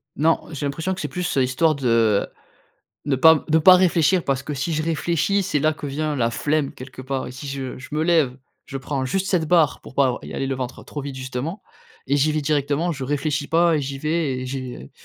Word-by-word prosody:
Non, 160 Hz, +3 st, +3 dB
j'ai 145 Hz, -2 st, -4 dB
l'impression 160 Hz, +6 st, -2 dB
que 185 Hz, -, -6 dB
c'est -, -, -2 dB
plus 180 Hz, -5 st, -3 dB
histoire 135 Hz, +5 st, +2 dB
de 115 Hz, -6 st, +2 dB, 0.8 s
ne 140 Hz, -2 st, +1 dB
pas 160 Hz, +3 st, +6 dB
de 160 Hz, -, +4 dB
pas 185 Hz, +4 st, +8 dB
réfléchir. 180 Hz, -1 st, +3 dB
Parce 135 Hz, -1 st, 0 dB
que 150 Hz, +1 st, -5 dB
si 145 Hz, +5 st, -2 dB
je 155 Hz, -, 0 dB
réfléchis, 170 Hz, +5 st, 0 dB
c'est 155 Hz, -5 st, 0 dB
là 155 Hz, +1 st, +3 dB
que 150 Hz, -1 st, -7 dB
vient 150 Hz, +2 st, -2 dB
la 115 Hz, -3 st, +1 dB
flemme 145 Hz, +3 st, -1 dB
quelque 130 Hz, 0 st, -10 dB
part 130 Hz, 0 st, -3 dB
et 125 Hz, -, -7 dB
si 130 Hz, +3 st, -8 dB
je 135 Hz, -2 st, -5 dB
je 130 Hz, -, -10 dB
me 155 Hz, +1 st, 0 dB
lève, 160 Hz, -7 st, +2 dB, 0.3 s
je 135 Hz, -, -6 dB
prends 135 Hz, 0 st, -3 dB
juste 190 Hz, +9 st, -1 dB
cette 170 Hz, -4 st, +1 dB
barre, 165 Hz, -4 st, +3 dB
pour -, -, -13 dB
pas 140 Hz, 0 st, +4 dB
avoir 125 Hz, -1 st, -3 dB
y -, -, -8 dB
aller 135 Hz, -, -2 dB
le 135 Hz, -, -1 dB
ventre 125 Hz, -1 st, -5 dB
trop 145 Hz, -, -6 dB
vide 140 Hz, -1 st, -6 dB
justement 130 Hz, -, -5 dB, 0.4 s
et 140 Hz, +2 st, +2 dB
j'y 155 Hz, +3 st, +2 dB
vais 155 Hz, 0 st, -1 dB
directement. 145 Hz, +3 st, 0 dB
Je 140 Hz, -4 st, -5 dB
réfléchis 145 Hz, +1 st, -1 dB
pas 165 Hz, 0 st, +3 dB
et -, -, 0 dB
j'y 135 Hz, 0 st, -5 dB
vais 155 Hz, -3 st, -1 dB
et -, -, -5 dB
j'ai 125 Hz, -, -6 dB
145 Hz, 235 wpm, -22 LUFS, 130-160 Hz, 0.8 s, pas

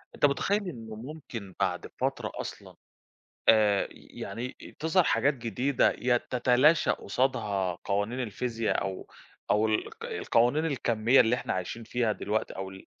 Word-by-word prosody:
أنت -, -, +3 dB
متخيّل 195 Hz, +8 st, +1 dB
إنّه 115 Hz, -7 st, -8 dB
ممكن 120 Hz, -, -8 dB
بعد 90 Hz, -2 st, 0 dB
فترة -, -, -1 dB
أصلًا -, -, -7 dB, 0.7 s
آآ، 105 Hz, -3 st, +5 dB
ي -, -, -16 dB
يعني 115 Hz, +6 st, -6 dB
تظهَر 165 Hz, +3 st, +3 dB
حاجات 135 Hz, +3 st, +2 dB
جديدة 125 Hz, +2 st, +1 dB
ي 120 Hz, -1 st, +1 dB
تتلاشى 130 Hz, +7 st, +3 dB
قُصادها 105 Hz, -6 st, 0 dB
قوانين 100 Hz, +5 st, -1 dB
الفيزياء 115 Hz, 0 st, -1 dB
أو 95 Hz, -1 st, -4 dB, 0.4 s
أو 110 Hz, +1 st, +3 dB
ال 110 Hz, -, +1 dB
الق -, -, -9 dB
القوانين 125 Hz, +7 st, +2 dB
الكَميّة 120 Hz, -3 st, +3 dB
اللي 115 Hz, +1 st, +2 dB
إحنا -, -, -3 dB
عايشين 95 Hz, +5 st, -4 dB
فيها 115 Hz, 0 st, 0 dB
دلوقتي 105 Hz, +1 st, -2 dB
أو 95 Hz, 0 st, -4 dB
ال 95 Hz, 0 st, -12 dB
115 Hz, 145 wpm, -29 LUFS, 105-130 Hz, 0.7 s, آآ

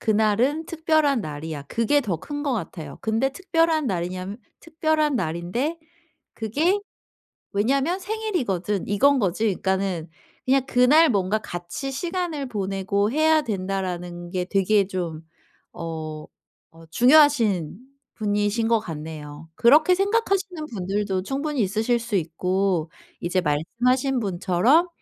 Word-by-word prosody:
그날은 220 Hz, +9 st, +1 dB
특별한 315 Hz, -5 st, +2 dB
날이야.' 150 Hz, -1 st, -6 dB
그게 230 Hz, +6 st, +2 dB
더 195 Hz, -8 st, -1 dB
큰 290 Hz, -, -6 dB
것 280 Hz, -, 0 dB
같아요. 160 Hz, -8 st, -6 dB
근데 225 Hz, +5 st, +1 dB
특별한 330 Hz, -3 st, +1 dB
날이냐면 185 Hz, +2 st, -3 dB, 0.2 s
'특별한 315 Hz, -3 st, 0 dB
날인데 185 Hz, -, -2 dB, 0.6 s
그게 295 Hz, -, +1 dB, 0.8 s
왜냐면 275 Hz, -, +1 dB
생일이거든.' 345 Hz, -, -2 dB
이건 275 Hz, +8 st, +4 dB
거지. 200 Hz, +2 st, 0 dB
그러니까는 190 Hz, -4 st, -1 dB, 0.4 s
그냥 265 Hz, 0 st, +3 dB
그날 275 Hz, +5 st, +5 dB
뭔가 200 Hz, 0 st, +1 dB
'같이 175 Hz, +7 st, -6 dB
시간을 335 Hz, -1 st, -3 dB
보내고 200 Hz, -1 st, -1 dB
해야 310 Hz, +1 st, +4 dB
된다.'라는 185 Hz, -4 st, -4 dB
게 180 Hz, -1 st, -1 dB
되게 195 Hz, +1 st, +2 dB
좀 170 Hz, -5 st, -4 dB, 0.5 s
어 155 Hz, -2 st, -6 dB, 0.5 s
어 165 Hz, 0 st, -16 dB
중요하신 240 Hz, -, +4 dB, 0.4 s
분이신 210 Hz, +1 st, 0 dB
것 230 Hz, -1 st, +4 dB
같네요. 155 Hz, -3 st, -8 dB
그렇게 305 Hz, +9 st, +6 dB
생각하시는 390 Hz, -5 st, 0 dB
분들도 195 Hz, -1 st, -2 dB
충분히 280 Hz, +2 st, -1 dB
있으실 220 Hz, +5 st, +1 dB
수 230 Hz, -1 st, -5 dB
있고 180 Hz, 0 st, 0 dB, 0.3 s
이제 180 Hz, +2 st, 0 dB
말씀하신 245 Hz, -, 0 dB
분처럼 205 Hz, -, +2 dB
215 Hz, 280 characters per minute, -24 LUFS, 180-290 Hz, 0.8 s, 그렇게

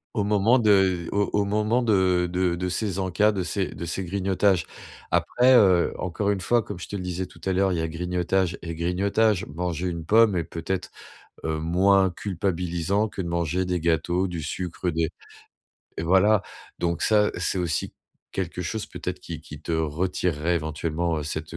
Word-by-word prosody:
Au 105 Hz, -, +1 dB
moment 105 Hz, +4 st, +3 dB
de 95 Hz, -6 st, +3 dB
au 100 Hz, 0 st, +1 dB
au 105 Hz, -1 st, +2 dB
moment 105 Hz, +4 st, +1 dB
de 95 Hz, -5 st, +3 dB
de 90 Hz, -1 st, +1 dB
de 90 Hz, +1 st, -3 dB
ces 95 Hz, 0 st, -2 dB
encas 95 Hz, +3 st, +2 dB
de 95 Hz, -3 st, -2 dB, 0.3 s
de 85 Hz, -, -5 dB
ces 90 Hz, +3 st, -3 dB
grignotages. 95 Hz, 0 st, +1 dB, 0.5 s
Après 125 Hz, +1 st, +4 dB
heu, 95 Hz, -8 st, +5 dB
encore 100 Hz, +3 st, -1 dB
une 100 Hz, -2 st, -2 dB
fois, 120 Hz, +3 st, +2 dB
comme 105 Hz, -4 st, -7 dB
je -, -, -7 dB
te -, -, -6 dB
le 95 Hz, -, -4 dB
disais 90 Hz, 0 st, -3 dB
tout -, -, -17 dB
à 95 Hz, -, +1 dB
l'heure, 95 Hz, +1 st, +2 dB
il 90 Hz, -, 0 dB
y -, -, 0 dB
a 80 Hz, -, -1 dB
grignotage 90 Hz, +2 st, -1 dB
et 85 Hz, -1 st, -4 dB
grignotage. 95 Hz, +5 st, +1 dB
Manger 90 Hz, +2 st, -3 dB
une 85 Hz, -2 st, -4 dB
pomme 110 Hz, +1 st, +5 dB
est 85 Hz, -, 0 dB
peut-être, 85 Hz, +3 st, -4 dB, 0.5 s
heu, 80 Hz, -1 st, -1 dB
moins 95 Hz, +4 st, +3 dB
culpabilisant 90 Hz, +1 st, -1 dB
que 100 Hz, -2 st, -5 dB
de -, -, -4 dB
manger 85 Hz, +2 st, -1 dB
des 90 Hz, -1 st, -1 dB
gâteaux, 85 Hz, +3 st, +1 dB
du 85 Hz, -3 st, -5 dB
sucre, 90 Hz, +2 st, -3 dB
des 80 Hz, -1 st, 0 dB, 0.9 s
et -, -, -3 dB
voilà. 95 Hz, +4 st, +4 dB, 0.4 s
Donc 85 Hz, -1 st, -1 dB
ça, 105 Hz, -1 st, +4 dB
c'est 95 Hz, -, 0 dB
aussi 85 Hz, -4 st, -2 dB, 0.4 s
quelque -, -, -4 dB
chose, -, -, -3 dB
peut-être, -, -, -6 dB
qui -, -, -7 dB
qui -, -, -11 dB
te 85 Hz, -, -4 dB
retirerait 80 Hz, +1 st, 0 dB
éventuellement, 80 Hz, +1 st, -2 dB
heu, 75 Hz, -, -3 dB
cette 80 Hz, +2 st, -5 dB
90 Hz, 185 wpm, -25 LUFS, 85-100 Hz, 0.9 s, heu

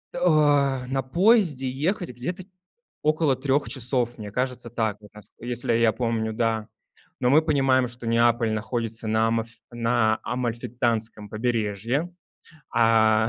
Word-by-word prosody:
О, 145 Hz, -6 st, +3 dB
на 135 Hz, 0 st, -1 dB
поезде 170 Hz, -, +2 dB
ехать 170 Hz, +7 st, -2 dB
где-то 160 Hz, +10 st, -5 dB, 0.6 s
около 155 Hz, -3 st, +2 dB
3 140 Hz, +2 st, 0 dB
часов. 125 Hz, -2 st, -1 dB
Мне 105 Hz, -2 st, -7 dB
кажется, 125 Hz, 0 st, -3 dB
так 110 Hz, -3 st, -1 dB
как 105 Hz, -1 st, -16 dB
раз. 105 Hz, -, -13 dB
Если 120 Hz, 0 st, -2 dB
я 115 Hz, -1 st, +4 dB
помню, 115 Hz, -2 st, -1 dB
да. 110 Hz, -1 st, -1 dB, 0.5 s
Но 125 Hz, -, +2 dB
мы 155 Hz, +4 st, +6 dB
понимаем, 135 Hz, -4 st, +2 dB
что 120 Hz, 0 st, -10 dB
Неаполь 115 Hz, 0 st, +2 dB
находится 115 Hz, +1 st, -3 dB
на 110 Hz, +1 st, +2 dB
амаф 115 Hz, 0 st, -1 dB, 0.2 s
на 115 Hz, -2 st, +1 dB
Амальфитанском 115 Hz, -3 st, -2 dB
побережье. 115 Hz, -, -1 dB, 0.6 s
А, 110 Hz, -1 st, +4 dB
120 Hz, 130 wpm, -25 LUFS, 115-135 Hz, 0.6 s, мы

